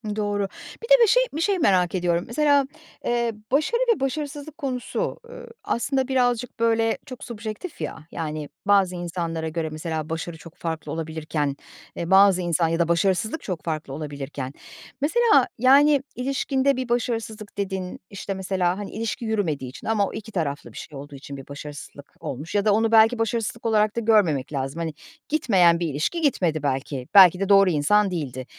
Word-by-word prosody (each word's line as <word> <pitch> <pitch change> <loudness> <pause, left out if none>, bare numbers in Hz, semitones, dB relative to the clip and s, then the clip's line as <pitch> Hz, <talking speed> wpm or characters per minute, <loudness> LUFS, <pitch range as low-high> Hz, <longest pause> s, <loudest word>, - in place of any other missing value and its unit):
Doğru. 205 -2 -1 0.4
Bir - - -5
de - - +8
bir - - +5
şey - - +5
bir 315 - -2
şey 390 +1 +1
merak 185 - +3
ediyorum. 175 -1 +1
Mesela, 285 +2 +3 0.4
eee, 235 -1 +1 0.2
başarı 310 - +2
ve - - -11
başarısızlık 290 +2 -4
konusu, 255 -3 -3
ııı, - - -10 0.2
aslında 260 +2 0
birazcık 250 -3 0
böyle 225 0 +2
çok 255 -2 -9
subjektif, 225 - -7
ya. - - -4
Yani, 155 -2 -4 0.2
bazı 195 -2 +3
insanlara 170 -2 -3
göre 160 0 -3
mesela 155 0 -4
başarı 165 0 -4
çok 165 0 -13
farklı 160 -3 -5
olabilirken, 155 -3 -2 0.4
eee, 170 +2 -4
bazı 195 -1 +6
insan 170 -1 +1
ya 165 +1 -1
da 170 - +2
başarısızlık 195 - +1
çok 180 -6 -4
farklı 155 -4 -4
olabilirken... 140 -2 -6 0.5
Mesela, 425 - +4
yani, 275 +3 +5
ilişkinde 270 +1 0
bir 255 -2 -3
başarısızlık 225 -3 -2
dediğin, 190 -2 -3
işte 200 0 -5
mesela, 185 -1 -1
hani, 205 -1 -6
ilişki 225 0 -4
yürümediği 165 - -1
için 130 - -10
ama 210 -3 +2
o - - -8
2 220 +1 -7
taraflı 150 -7 -3
bir - - -11
şey 145 - -8
olduğu 145 +1 -9
için 140 0 -9
bir 135 - -11
başarısızlık 145 0 -10
olmuş 145 +8 -6
ya 205 0 +2
da 210 - +4
onu 225 +1 +2
belki 225 +1 +5
başarısızlık 230 0 -2
olarak 215 -1 +2
da 235 - 0
görmemek 185 - +2
lazım. 135 +3 -3
Hani, 165 -2 -3 0.4
gitmeyen 190 - +4
bir 170 - -1
ilişki 155 - -2
gitmedi 175 - +1
belki, 135 -1 -2
belki 185 -3 +8
de 195 0 -1
doğru 195 -1 +6
insan 185 +6 +3
değildi. 130 -7 -4
195 Hz, 175 wpm, -24 LUFS, 160-235 Hz, 0.5 s, de